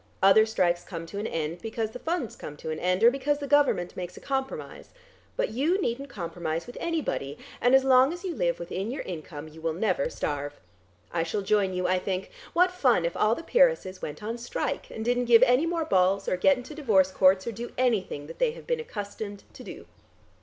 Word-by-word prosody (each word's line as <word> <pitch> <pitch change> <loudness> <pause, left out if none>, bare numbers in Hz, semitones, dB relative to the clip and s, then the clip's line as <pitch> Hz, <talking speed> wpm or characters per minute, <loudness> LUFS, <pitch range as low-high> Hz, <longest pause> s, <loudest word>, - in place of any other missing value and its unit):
Other 205 +3 +7
strikes 175 -5 +1
come 165 -3 -7
to 200 +5 -6
an 215 - -2
end, 165 +2 -3
because 225 -1 -3
the 250 - -8
funds 320 -4 -2
come 150 - -9
to 160 - -5
an 155 - -4
end, 185 +3 0
or 235 - +8
because 275 +2 0
the 285 - -5
Government 280 -11 +2
makes 180 -1 -6
a - - -7
compromise. 270 - -4 0.5
But - - 0
you 300 - +1
needn't 275 -4 -2
compromise 170 -3 -4
with 245 - -11
anybody, 300 - -2 0.2
and 245 +2 +5
as 265 - +5
long 260 +1 +5
as 350 +2 -7
you 370 -3 -3
live 170 - 0
within 185 +4 -4
your 265 - -4
income, 155 -3 -7
you 155 +1 -13
will 165 0 -1
never 185 -6 0
starve. 145 0 -4 0.5
I 170 - 0
shall 170 +5 -2
join 195 -2 +1
you, 180 0 -1
I 185 0 +2
think. 185 0 -3 0.2
What 360 +1 +4
fun 255 - +2
if 170 - -2
all 215 +2 +3
the 330 - -8
peeresses - - +2
went 150 +5 -6
on 230 +3 -4
strike, 240 - -3
and 220 - -6
didn't 245 +1 +1
give 235 0 +7
any 260 +5 +4
more 335 -1 -1
balls 195 -4 +2
or - - +1
get 275 +9 +4
into 250 +5 -8
divorce 210 -11 +3
courts, 190 0 +4
or 235 - -2
do 235 +2 -7
anything 215 - 0
that 150 - -11
they - - +2
have - - -12
been 485 -1 -1
accustomed 205 - -6
to - - -11
do." - - -9
215 Hz, 220 wpm, -27 LUFS, 180-265 Hz, 0.5 s, or